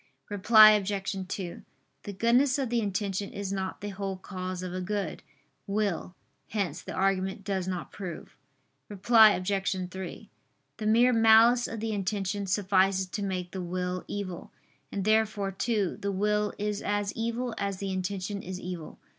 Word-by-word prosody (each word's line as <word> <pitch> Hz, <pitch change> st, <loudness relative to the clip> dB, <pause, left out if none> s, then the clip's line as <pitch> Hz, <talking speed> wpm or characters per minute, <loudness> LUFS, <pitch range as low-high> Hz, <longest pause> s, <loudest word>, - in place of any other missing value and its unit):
Reply 215 Hz, +1 st, +8 dB
Obj. 200 Hz, -1 st, 0 dB
2: 185 Hz, -2 st, -5 dB, 0.4 s
The 205 Hz, -, -4 dB
goodness 245 Hz, +7 st, +3 dB
of 265 Hz, -4 st, -2 dB
the 240 Hz, -, +2 dB
intention 200 Hz, -1 st, -2 dB
is 200 Hz, -1 st, -4 dB
not 190 Hz, -1 st, -4 dB
the 205 Hz, -, -4 dB
whole 195 Hz, -1 st, -4 dB
cause 185 Hz, -1 st, -5 dB
of 180 Hz, -1 st, -5 dB
a 185 Hz, -, -3 dB
good 195 Hz, -2 st, -3 dB, 0.5 s
will. 200 Hz, -3 st, -1 dB, 0.3 s
Hence 190 Hz, -7 st, -2 dB
the -, -, -7 dB
argument 195 Hz, 0 st, 0 dB
does 190 Hz, -2 st, -2 dB
not 180 Hz, -2 st, -4 dB
prove. 180 Hz, -5 st, -8 dB, 0.5 s
Reply 215 Hz, +2 st, +6 dB
Obj. 190 Hz, -1 st, -1 dB
3: 190 Hz, -1 st, -7 dB, 0.5 s
The 215 Hz, -2 st, -3 dB
mere 240 Hz, +3 st, +5 dB
malice 225 Hz, +2 st, +6 dB
of 225 Hz, -1 st, -6 dB
the 225 Hz, 0 st, -2 dB
intention 200 Hz, 0 st, -2 dB
suffices 190 Hz, -1 st, +2 dB
to 205 Hz, -, -4 dB
make 185 Hz, -3 st, -3 dB
the 190 Hz, -, -4 dB
will 180 Hz, +1 st, -3 dB
evil: 190 Hz, -4 st, -5 dB, 0.4 s
and 195 Hz, -2 st, -3 dB
therefore 215 Hz, -2 st, +2 dB
too, 205 Hz, -1 st, -1 dB
the 200 Hz, -, -1 dB
will 210 Hz, +2 st, +1 dB
is 210 Hz, 0 st, -2 dB
as 205 Hz, 0 st, -1 dB
evil 235 Hz, +1 st, -2 dB
as 200 Hz, -1 st, -2 dB
the 195 Hz, 0 st, -4 dB
intention 190 Hz, +2 st, -3 dB
is 185 Hz, -1 st, -6 dB
evil. 175 Hz, -3 st, -7 dB
200 Hz, 160 wpm, -28 LUFS, 185-210 Hz, 0.5 s, Reply